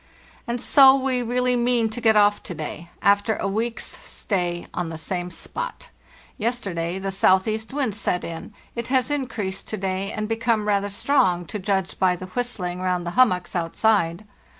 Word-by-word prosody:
"And 240 +1 -2
so 270 +2 +7
we 260 -2 0
really 250 +1 +1
mean 240 -1 +2
to 240 - -6
get 220 -2 +4
off 205 0 +4
to 175 - -7
day, 155 +2 -6
after 205 +2 +3
a - - -2
week's 225 +4 -3
stay 175 -4 -2
on 175 -2 -2
the 160 - -6
same 175 +2 -3
spot. - - -6 0.5
Yesterday 190 -7 -2
the 195 0 -3
southeast 195 +3 +2
wind 265 -6 -1
set 190 -3 -1
in; 165 +4 -7 0.2
it 235 -1 -4
has 260 0 +1
increased 215 -9 -3
to 215 - -3
day 190 0 -2
and 215 0 -3
become 225 -1 0
rather 200 -1 +1
strong, 200 -5 +2
to 210 - -5
judge 190 -1 -1
by 185 -1 +3
the 185 - -8
whistling 185 -4 -3
round 180 -1 -1
the 170 - -3
hummocks 185 -7 +2
outside. 175 +1 +1
205 Hz, 175 wpm, -23 LUFS, 180-235 Hz, 0.5 s, so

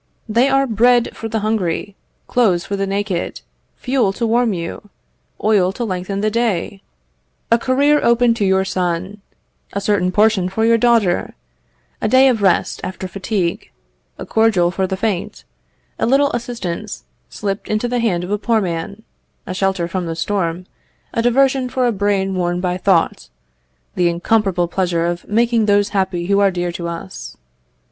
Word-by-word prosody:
They 235 +5 +3
are 270 0 +3
bread 240 +1 +2
for 225 - -6
the 220 -1 -2
hungry, 205 -2 -1 0.3
clothes 195 -8 +1
for 200 - -3
the 195 0 -2
naked, 195 -2 -2 0.3
fuel 250 -6 0
to 235 - -2
warm 235 +1 +2
you, 175 +3 -6 0.5
oil 200 -4 +3
to 240 - -4
lengthen 195 -1 -3
the 215 0 +1
day, 205 -4 -1 0.7
a 230 - +5
career 280 +4 +2
open 235 0 +4
to 230 - -2
your 190 0 +2
son, 185 +2 -2 0.5
a 200 - -1
certain 200 -3 +1
portion 205 -2 +2
for 220 +4 0
your 230 0 +4
daughter, 225 -7 +2 0.7
a - - +1
day 260 +1 +5
of 230 -4 0
rest 190 -2 +1
after 185 0 -5
fatigue, 190 -1 -3 0.5
a - - -7
cordial 210 -6 +2
for 190 +1 -1
the 190 - -3
faint, 210 0 -3 0.6
a - - +1
little 280 +3 +3
assistance 215 -5 -5 0.3
slipped 200 -1 -4
into 215 +3 -1
the 245 0 -1
hand 190 -7 0
of 180 - -6
a 210 - 0
poor 225 +1 +1
man, 185 +3 -4 0.4
a 185 - -5
shelter 190 -2 0
from 175 0 -3
the 165 - -3
storm, 175 0 -2 0.5
a 230 - +1
diversion 260 +2 +2
for 255 0 0
a 240 - +2
brain 200 -2 0
worn 175 -1 -1
by 180 -1 -1
thought, 185 -2 +1 0.6
the 175 -1 +2
incomparable 180 0 +1
pleasure 175 -2 0
of 175 0 -4
making 230 0 +2
those 205 0 +3
happy 190 -4 -1
who 200 +2 +2
are 200 -1 +4
dear 175 -1 -2
to 170 0 -5
us. 170 +3 -7
200 Hz, 170 wpm, -18 LUFS, 180-230 Hz, 0.7 s, a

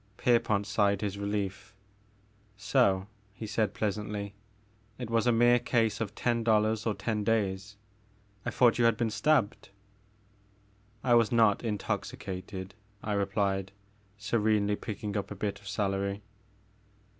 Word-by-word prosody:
Pierpont 110 -4 +2
sighed 100 -2 +1
his 100 -1 -3
relief. 100 -1 -3 0.8
So," 95 -3 +2 0.3
he 110 - -6
said 110 0 -1
pleasantly, 105 -1 -3 0.6
it 120 -3 -6
was 115 +1 +2
a - - +5
mere 120 +1 +5
case 115 -3 +1
of 110 -1 -3
ten 120 -1 0
dollars 110 0 +2
or 110 - 0
ten 110 -2 -2
days. 100 -2 -1 0.7
I - - -2
thought 120 -1 +3
you 120 - +4
had 115 -2 +4
been 115 -1 0
stabbed 135 -4 +1 0.7
" 100 +1 -35
I 125 - +3
was 115 -3 +4
not 115 -2 +4
intoxicated," 95 -3 -4 0.3
I 105 - -2
replied, 100 -1 0 0.4
serenely 105 -1 +1
picking 105 -1 -5
up 100 - -2
a 105 - -6
bit 100 +1 -3
of 100 - -14
celery. 100 0 -1
105 Hz, 135 wpm, -30 LUFS, 100-115 Hz, 0.8 s, a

